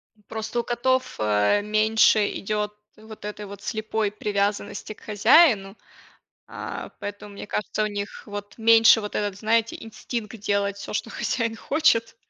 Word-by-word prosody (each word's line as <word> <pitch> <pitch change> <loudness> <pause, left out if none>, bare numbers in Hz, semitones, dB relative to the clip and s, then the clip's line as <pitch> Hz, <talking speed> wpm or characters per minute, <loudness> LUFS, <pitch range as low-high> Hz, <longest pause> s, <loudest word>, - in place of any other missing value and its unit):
М, 210 - -29
просто 220 +2 -3
у - - -12
котов, 255 +2 0
э, 105 - +2
меньше 215 +1 +4 0.2
идёт 210 0 -2 0.2
вот 220 -1 -12
этой 210 0 -6
вот 200 0 -10
слепой 215 0 -2
привязанности 205 0 -2
к - - -23
хозяину, 210 - +4 0.7
а, - - -7
поэтому 205 0 -7
мне - - -8
кажется, 210 +1 -2
у - - +1
них 205 0 -6
вот 205 0 -7
меньше 225 0 +6
вот 210 -1 -6
этот, 205 -2 -2
знаете, 225 +1 +1
инстинкт 225 -1 -6
делать 200 -1 0
всё, 200 - -7
что 220 +2 -3
хозяин 230 -1 -2
хочет. 230 -7 +1
210 Hz, 150 wpm, -24 LUFS, 205-225 Hz, 0.7 s, меньше